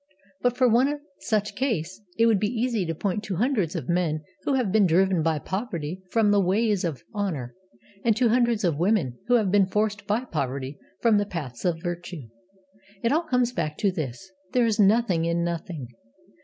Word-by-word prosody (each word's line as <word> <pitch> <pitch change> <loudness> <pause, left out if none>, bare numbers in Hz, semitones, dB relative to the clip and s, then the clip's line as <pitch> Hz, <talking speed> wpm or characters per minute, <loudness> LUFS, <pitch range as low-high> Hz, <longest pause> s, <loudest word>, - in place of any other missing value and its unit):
But, 245 0 +1
for 255 - +5
one 260 +6 +3 0.2
such 210 -2 -1
case, 205 - -2 0.2
it 230 - +5
would 225 -4 +4
be 210 - +1
easy 230 -5 -1
to 165 - -2
point 200 +4 -2
to 195 - -3
hundreds 210 - 0
of - - -4
men 170 -3 0 0.2
who 280 - +2
have 245 -7 +1
been 205 -2 +4
driven 185 +1 +3
by 160 0 +1
poverty 185 -2 -4
from 220 -1 +3
the 205 -1 +4
ways 205 +2 +1
of 160 -6 -3
honour, 165 - -3 0.5
and 225 -2 +3
to 245 -1 +3
hundreds 235 -2 +2
of 165 -5 +1
women 175 - +1
who 245 - +4
have 210 -6 +2
been 200 -1 +4
forced 210 0 -1
by 220 +5 0
poverty 140 - -3 0.2
from 225 -3 +4
the 205 - 0
paths 145 -10 -6
of 170 -2 0
virtue. 175 -7 -5 0.7
It 230 - +2
all 315 +4 +3
comes 250 -3 +2
back 155 -9 -3
to 200 - +2
this: 155 +1 -5 0.2
there 245 -2 +4
is 220 -1 0
nothing 200 -5 +3
in 170 0 0
Nothing. 165 -6 -4
195 Hz, 195 wpm, -25 LUFS, 165-225 Hz, 0.7 s, for